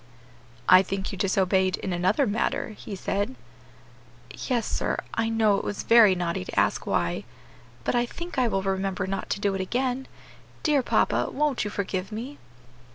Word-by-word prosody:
"I 185 0 +9
think 195 +1 -3
you 195 - -6
disobeyed 190 -1 +2
in 190 - -3
another 185 +11 +2
matter," 220 +1 -1
he 210 -1 -8
said. 195 -5 -2 1.1
"Yes, 240 -4 +1
sir, - - -1 0.2
I 225 0 0
know 220 -3 +3
it - - -6
was 205 - -3
very 225 -5 +7
naughty 170 - -2
to - - -2
ask - - +1
why, 85 +3 0 0.6
but - - 0
I 240 0 +2
think 340 +1 -5
I 250 - +3
will 195 -4 -1
remember 195 0 -1
not 195 +1 -4
to - - -1
do 200 -1 +1
it 195 - -2
again. 255 +6 -1 0.6
Dear 295 -3 +3
papa, - - +1
won't 295 -2 0
you 205 - -3
forgive 190 -1 -3
me?" 245 +7 -6
200 Hz, 170 wpm, -26 LUFS, 190-240 Hz, 1.1 s, I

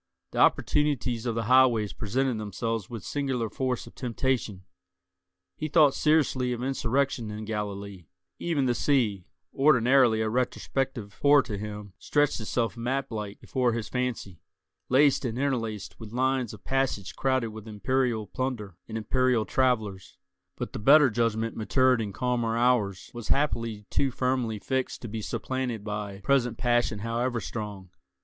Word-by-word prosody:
The - - -3
opportunities 130 -5 +2
of 115 - -1
the 115 - -1
highways 120 -3 +4
presented 125 +2 -1
themselves 110 0 -3
with 115 -3 -7
singular 130 -6 -2
force 130 -2 -2
of - - -13
temptation; 120 -6 -2 0.9
he 155 - -3
thought 150 -2 +5
seriously 145 -5 +2
of 120 0 -4
insurrection 135 -2 0
in 105 +1 -6
Galilee; 100 -4 -5 0.3
even 155 -6 0
the 125 - +2
sea, 115 -8 +1 0.3
ordinarily 130 -4 +4
a 110 - 0
retrospective 125 -1 -2
horror 145 -1 +6
to 110 -4 -5
him, 105 -1 -7
stretched 145 -3 +1
itself 115 +2 -1
map 130 +3 -2
like 105 -2 -5
before 125 -3 0
his 115 -2 -4
fancy, 125 -9 -3 0.5
laced 140 +2 +4
and 120 -2 -2
interlaced 115 -6 -2
with 110 -2 -9
lines 130 -1 0
of 105 - -12
passage 135 -8 -1
crowded 130 -3 +1
with 110 0 -10
imperial 110 +2 0
plunder 105 -5 -4
and 110 - -4
imperial 125 +1 +1
travellers; 110 - 0 0.4
but - - -5
the - - -4
better 140 +4 +6
judgment 115 0 0
matured 130 +2 +2
in 105 -2 -3
calmer 120 0 -1
hours 115 -6 +1
was 120 -2 -7
happily 115 -7 0
too 140 - +2
firmly 125 -3 -1
fixed 130 +5 -3
to - - -4
be 110 +1 -5
supplanted 125 -1 -3
by 105 -2 -5
present 125 0 +1
passion 120 -3 +1
however 115 +3 -1
strong. 105 -6 -6
120 Hz, 150 wpm, -27 LUFS, 105-130 Hz, 0.9 s, horror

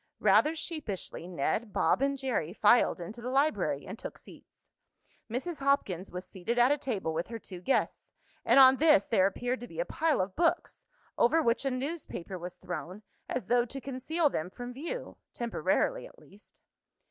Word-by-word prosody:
Rather 215 +10 +4
sheepishly 295 - -5
Ned, 185 +6 -1
Bob - - +2
and 275 0 +1
Jerry 245 - -2
filed 215 0 +4
into 210 +8 -8
the 245 - -4
library, 280 +4 +1
and - - -8
took - - -7
seats. - - -16 0.6
Mrs. 285 +9 -4
Hopkins 205 -10 0
was 180 +1 -6
seated 200 +6 -4
at 245 +3 +5
a 290 - +3
table 210 - -2
with 165 +2 -2
her 230 - -6
two 185 -5 -10
guests, 270 - -1 0.3
and - - +5
on 265 0 +8
this 305 0 +5
there 195 -5 +4
appeared 245 +6 -2
to 245 - -8
be - - -10
a - - +1
pile 320 - 0
of 185 +1 -2
books, 335 0 0 0.3
over 290 +8 +4
which 235 +4 +1
a - - +2
newspaper 255 - -5
was 180 +1 -7
thrown, 180 +4 -7 0.3
as 250 - -2
though 245 0 +3
to 270 +3 -7
conceal 275 +5 -1
them 180 - -2
from 245 +5 -8
view, 340 - -6 0.2
temporarily - - 0
at - - -19
least. 205 +2 -17
245 Hz, 180 wpm, -30 LUFS, 195-280 Hz, 0.6 s, on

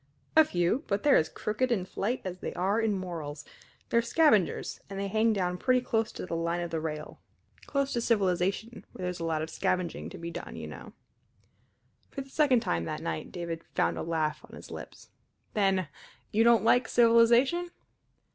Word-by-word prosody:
"A 315 - +9
few; 180 - 0
but 200 +1 -1
they're 290 - +6
as 155 - +3
crooked 245 +4 -1
in 195 -6 +1
flight 205 +6 -2
as 185 -1 -5
they - - -5
are 195 +5 +1
in 220 -2 +1
morals. 160 -5 -6 0.4
They're 235 - +3
scavengers, 235 - +2
and 195 0 -5
they 200 - -1
hang 220 +3 +2
down 180 -3 -1
pretty 255 -1 +3
close 225 -2 0
to - - -6
the 180 - -6
line 170 +1 -1
of 170 -1 -5
rail 155 -1 -4 0.5
close 275 -1 0
to 235 - 0
civilization, 200 +1 0
where 185 - -8
there's 180 -1 -3
a - - -4
lot 160 -1 0
of 160 - -6
scavenging 180 0 -1
to 190 - -9
be 170 0 -6
done, - - -7
you - - -6
know." - - -10 1.2
For 275 - -5
the 270 - -11
second 270 -6 +3
time 85 - -1
that - - -4
night 80 -1 -4
David 170 -2 -5
found - - +2
a - - -4
laugh 160 -2 -1
on - - -11
his - - -11
lips. - - -10 0.4
"Then 195 -4 +2 0.4
you 220 +2 +3
don't 235 -1 +5
like 245 +2 +4
civilization?" 240 +8 +4
195 Hz, 190 wpm, -29 LUFS, 170-235 Hz, 1.2 s, A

